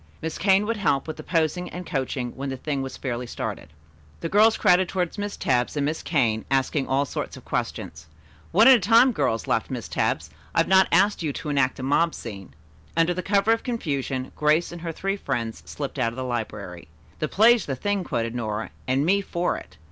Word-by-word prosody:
Miss 160 - -5
Kane 195 +2 +4
would 230 +1 -1
help 150 -9 +1
with 155 - -5
the - - -7
posing 170 +1 0
and 180 +1 -7
coaching 130 -3 -2
when 135 +1 -5
the 135 - -4
thing 140 +1 -2
was 135 0 -6
fairly 125 -2 -4
started. 110 - -5 0.5
The 165 - -3
girls 215 +4 +5
crowded 180 +1 +3
around 180 -2 -1
Miss 205 0 -4
Tebbs 125 +3 0
and 140 - +1
Miss 155 +2 -2
Kane, 115 -9 +1
asking 135 +1 +1
all 135 +2 +1
sorts - - -5
of - - -14
questions. 75 0 -4 0.4
"One 215 +7 +6
at 265 - +10
a 245 - +5
time, 230 +6 +5
girls," 115 - 0
laughed - - 0
Miss - - -5
Tebbs. - - -1 0.2
"I - - +4
have - - -1
not 190 0 +5
asked 200 +4 +3
you 155 -3 -1
to 150 - -5
enact 140 -3 +1
a 130 - -6
mob 150 +5 +2
scene." 95 - -9 0.4
Under 165 +1 +3
cover 200 +3 +2
of 230 - +3
the - - -23
confusion, 140 - -2
Grace 155 +3 +2
and 175 -1 -8
her 165 -1 -3
three 195 +4 -2
friends 115 - -3
slipped 140 -1 -5
out 115 -2 +1
of - - -12
the 130 - -3
library. 105 -7 -5 0.3
"'The 155 - 0
play's 225 +3 +4
the 135 - -1
thing,'" 205 +7 -1
quoted 115 -7 -2
Nora, 110 -3 -3 0.2
"and 135 +3 +2
me 200 +4 +3
for 175 -2 -1
it." - - -11
150 Hz, 215 wpm, -25 LUFS, 130-190 Hz, 0.5 s, at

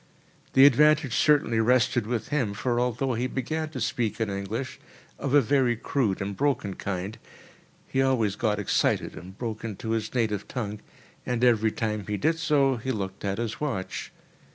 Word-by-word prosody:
The 135 +1 +8
advantage 150 -1 +5
certainly 140 -4 +3
rested 120 -1 +2
with 115 -2 -2
him, 125 -9 0
for 120 +4 0
although 125 +2 0
he 120 +2 -1
began 155 +5 -3
to 155 - -6
speak 120 -4 -1
in 110 -3 -1
English, 100 +7 -4 0.4
of 140 0 0
a 145 - +7
very 130 -1 +2
crude 110 -4 -1
and 100 0 -4
broken 135 -8 0
kind, 100 +3 -4 0.7
he 135 - 0
always 120 -7 +2
got 105 -1 0
excited 105 - 0
and 95 +3 -11
broke 110 -3 -4
into 110 0 -4
his 110 +1 -2
native 110 -5 0
tongue—and 115 +1 -6
every 110 -3 +4
time 105 -3 -3
he 105 0 -1
did 160 - +1
so, 140 -5 +2
he 130 +3 -3
looked 95 -5 -4
at 100 -1 -1
his 115 +2 -4
watch. 120 -11 -3
115 Hz, 170 wpm, -26 LUFS, 105-135 Hz, 0.7 s, The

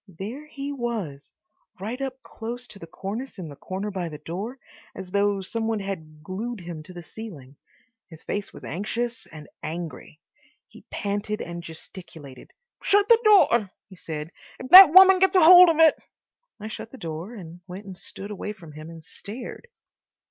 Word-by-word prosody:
There 245 - -7
he 280 -1 -6
was 225 - -5 0.5
right 225 +7 -5
up 265 -1 -5
close 240 +2 -7
to 200 - -10
the 165 - -10
cornice 210 +10 -6
in 175 -4 -7
the 145 - -10
corner 195 +7 -5
by 180 -3 -4
the 150 - -8
door, 190 - -6 0.4
as 185 -1 -8
though 200 0 +1
some 225 +4 -3
one 225 -1 -1
had 160 -6 -7
glued 210 +5 -5
him 170 -2 -7
to 170 +4 -12
the 175 -1 -9
ceiling. 155 - -10 0.5
His 160 -3 -14
face 205 -1 -4
was - - -13
anxious 230 +6 -4
and 150 -2 -12
angry. 165 -1 -7 0.5
He - - -17
panted 205 +1 -3
and 170 0 -6
gesticulated. 160 -4 -11 0.3
"Shut 410 +2 +3
the 465 -1 +7
door," 305 - +5 0.2
he 190 - -13
said. 160 -2 -7 0.3
"If 255 - -9
that 370 -4 +12
woman 375 +1 +8
gets 380 0 +4
hold 360 +1 +9
of 325 - +1
it—" 320 -2 +5 0.6
I 210 - -6
shut 220 - -7
the 265 - -11
door, 170 +4 -6
and 175 -3 -11
went 190 +3 -9
and 190 -2 -9
stood 200 +3 -7
away 210 +1 -5
from 170 -6 -14
him 155 +2 -10
and 165 -2 -12
stared. 240 - -9
200 Hz, 175 wpm, -25 LUFS, 170-245 Hz, 0.6 s, that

